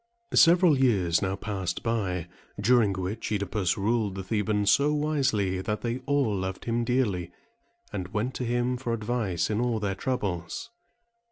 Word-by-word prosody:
Several 170 Hz, -4 st, +6 dB
years 95 Hz, -10 st, +3 dB
now 95 Hz, -1 st, -1 dB
passed 95 Hz, -4 st, -4 dB
by, 95 Hz, -7 st, -1 dB, 0.3 s
during 110 Hz, 0 st, +4 dB
which 95 Hz, +4 st, -4 dB
OEdipus 100 Hz, -2 st, 0 dB
ruled 105 Hz, -1 st, 0 dB
the 95 Hz, -, -4 dB
Thebans 105 Hz, 0 st, +1 dB
so 145 Hz, +1 st, +3 dB
wisely, 135 Hz, -11 st, 0 dB
that 105 Hz, +2 st, -3 dB
they 120 Hz, +1 st, -2 dB
all 140 Hz, -7 st, +2 dB
loved 95 Hz, -1 st, -4 dB
him 120 Hz, 0 st, 0 dB
dearly, 105 Hz, -9 st, 0 dB, 0.6 s
and 95 Hz, -3 st, -3 dB
went 110 Hz, +7 st, -2 dB
to -, -, -4 dB
him 120 Hz, +1 st, 0 dB
for 120 Hz, -2 st, -3 dB
advice 110 Hz, -6 st, -1 dB
in 105 Hz, +2 st, 0 dB
all 120 Hz, -2 st, 0 dB
their 100 Hz, -2 st, -1 dB
troubles. 95 Hz, -, -3 dB
105 Hz, 155 wpm, -27 LUFS, 95-125 Hz, 0.6 s, Several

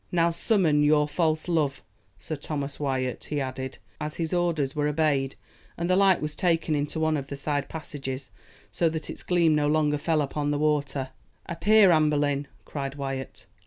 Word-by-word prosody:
"Now 170 Hz, -1 st, +3 dB
summon 170 Hz, -4 st, +2 dB
your 150 Hz, 0 st, +4 dB
false 155 Hz, 0 st, 0 dB
love, 155 Hz, -5 st, 0 dB, 0.3 s
Sir 155 Hz, -, -5 dB
Thomas 145 Hz, -1 st, -5 dB
Wyat," 130 Hz, -3 st, -2 dB
he 150 Hz, -, -2 dB
added, 130 Hz, -1 st, -4 dB, 0.2 s
as 150 Hz, 0 st, -4 dB
his 165 Hz, 0 st, -2 dB
orders 165 Hz, -6 st, 0 dB
were 150 Hz, 0 st, +1 dB
obeyed, 145 Hz, -3 st, +1 dB, 0.4 s
and 170 Hz, -, -1 dB
the 185 Hz, -, +3 dB
light 195 Hz, -3 st, +4 dB
was 150 Hz, 0 st, -2 dB
taken 165 Hz, -2 st, +1 dB
into 145 Hz, +2 st, -1 dB
one 160 Hz, -1 st, +2 dB
of 140 Hz, -1 st, -5 dB
the 140 Hz, -, -5 dB
side 145 Hz, 0 st, -2 dB
passages, 135 Hz, -4 st, -6 dB, 0.4 s
so 170 Hz, -, +2 dB
that 160 Hz, 0 st, -4 dB
its -, -, -6 dB
gleam 170 Hz, -3 st, +3 dB
no 150 Hz, -1 st, +2 dB
longer 150 Hz, -1 st, +2 dB
fell 155 Hz, 0 st, +1 dB
upon 145 Hz, +1 st, -2 dB
the 145 Hz, -, +1 dB
water. 145 Hz, -3 st, 0 dB, 0.4 s
"Appear, 200 Hz, +3 st, +5 dB
Anne 155 Hz, -2 st, +4 dB
Boleyn!" 145 Hz, -1 st, 0 dB, 0.2 s
cried 140 Hz, -1 st, -5 dB
Wyat. 135 Hz, -2 st, -5 dB
150 Hz, 180 wpm, -26 LUFS, 140-160 Hz, 0.4 s, Appear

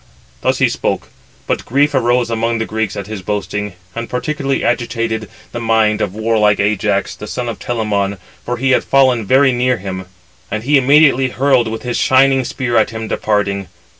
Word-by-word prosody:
Thus -, -, +1 dB
he -, -, +3 dB
spoke, -, -, -2 dB, 0.4 s
but -, -, -1 dB
grief 145 Hz, +4 st, +1 dB
arose 120 Hz, -2 st, +1 dB
among 115 Hz, 0 st, 0 dB
the 115 Hz, -, -2 dB
Greeks 110 Hz, -3 st, -2 dB
at 100 Hz, -, -4 dB
his 105 Hz, -1 st, -6 dB
boasting, 105 Hz, +1 st, -3 dB, 0.2 s
and 115 Hz, 0 st, -5 dB
particularly 135 Hz, +2 st, -2 dB
agitated 115 Hz, -3 st, -1 dB, 0.2 s
the 120 Hz, -, -4 dB
mind 110 Hz, -2 st, +2 dB
of 100 Hz, -1 st, -2 dB
warlike 110 Hz, -2 st, +2 dB
Ajax, 100 Hz, -1 st, 0 dB
the 105 Hz, -, -9 dB
son 125 Hz, +3 st, -4 dB
of 115 Hz, -, -5 dB
Telamon, 105 Hz, -4 st, -1 dB, 0.3 s
for 120 Hz, 0 st, -3 dB
he 135 Hz, +2 st, +1 dB
had -, -, +3 dB
fallen 130 Hz, -6 st, +3 dB
very 130 Hz, +2 st, +5 dB
near 125 Hz, 0 st, +1 dB
him; 95 Hz, -2 st, -6 dB, 0.4 s
and 110 Hz, +1 st, -3 dB
he 145 Hz, +4 st, +2 dB
immediately 135 Hz, -1 st, +4 dB
hurled 130 Hz, -2 st, +2 dB
with 110 Hz, 0 st, -5 dB
his 125 Hz, -1 st, -2 dB
shining 135 Hz, 0 st, +4 dB
spear 120 Hz, -1 st, -2 dB
at 110 Hz, -, +3 dB
him 110 Hz, 0 st, -5 dB
departing. 100 Hz, -3 st, -1 dB
115 Hz, 180 wpm, -16 LUFS, 105-125 Hz, 0.4 s, very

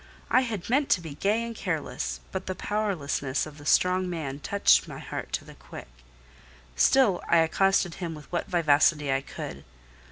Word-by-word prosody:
I 255 Hz, -, +5 dB
had 225 Hz, -8 st, -4 dB
meant 275 Hz, +4 st, +1 dB
to -, -, -12 dB
be 160 Hz, -4 st, -7 dB
gay 210 Hz, +9 st, 0 dB
and 230 Hz, 0 st, -6 dB
careless, -, -, -3 dB
but 190 Hz, 0 st, -5 dB
the 185 Hz, -, -3 dB
powerlessness 180 Hz, -10 st, -1 dB
of 155 Hz, -1 st, -11 dB
the 145 Hz, -, -9 dB
strong 180 Hz, 0 st, +3 dB
man 150 Hz, -5 st, -4 dB
touched 200 Hz, +7 st, +3 dB
my -, -, -8 dB
heart -, -, -6 dB
to -, -, -2 dB
the -, -, -12 dB
quick: -, -, -11 dB, 0.9 s
still 210 Hz, -, +4 dB
I 170 Hz, -, +5 dB
accosted 175 Hz, +2 st, +2 dB
him 165 Hz, -2 st, -3 dB
with 150 Hz, -1 st, -11 dB
what 175 Hz, -, -2 dB
vivacity 150 Hz, -3 st, +3 dB
I 135 Hz, -, 0 dB
could. 70 Hz, -, -8 dB
175 Hz, 180 wpm, -27 LUFS, 145-200 Hz, 0.9 s, I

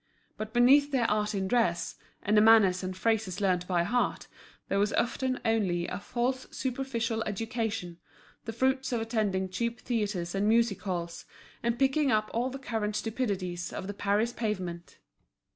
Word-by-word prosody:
But 215 Hz, 0 st, -5 dB
beneath 270 Hz, +5 st, +5 dB
their 255 Hz, -5 st, +1 dB
art 210 Hz, 0 st, 0 dB
in 190 Hz, -1 st, -1 dB
dress, 185 Hz, -7 st, +1 dB, 0.3 s
and 210 Hz, -, +2 dB
the 210 Hz, -, +7 dB
manners 215 Hz, -5 st, +6 dB
and 185 Hz, 0 st, -5 dB
phrases 210 Hz, -2 st, 0 dB
learnt 180 Hz, -3 st, +1 dB
by 175 Hz, -2 st, +2 dB
heart, 245 Hz, +7 st, 0 dB, 0.4 s
there 195 Hz, -, 0 dB
was 205 Hz, +1 st, +1 dB
often 255 Hz, +1 st, 0 dB
only 190 Hz, -6 st, +1 dB
a 180 Hz, -, -4 dB
false 250 Hz, +5 st, -2 dB
superficial 240 Hz, -3 st, -2 dB
education, 220 Hz, -4 st, -3 dB, 0.5 s
the 225 Hz, -, -3 dB
fruits 260 Hz, +3 st, 0 dB
of 240 Hz, -, 0 dB
attending 215 Hz, -4 st, 0 dB
cheap 235 Hz, +5 st, -3 dB
theatres 205 Hz, -7 st, -2 dB
and 200 Hz, +2 st, +1 dB
music 230 Hz, -2 st, +2 dB
halls, 170 Hz, -3 st, -4 dB, 0.4 s
and 235 Hz, 0 st, 0 dB
picking 270 Hz, +2 st, +2 dB
up 215 Hz, -1 st, +1 dB
all 240 Hz, +3 st, 0 dB
the 265 Hz, -, -6 dB
current 220 Hz, -6 st, -3 dB
stupidities 200 Hz, -7 st, -2 dB
of -, -, -5 dB
the 205 Hz, -, -4 dB
Paris 205 Hz, +4 st, 0 dB
pavement. 185 Hz, -7 st, -4 dB
220 Hz, 160 wpm, -29 LUFS, 190-240 Hz, 0.5 s, the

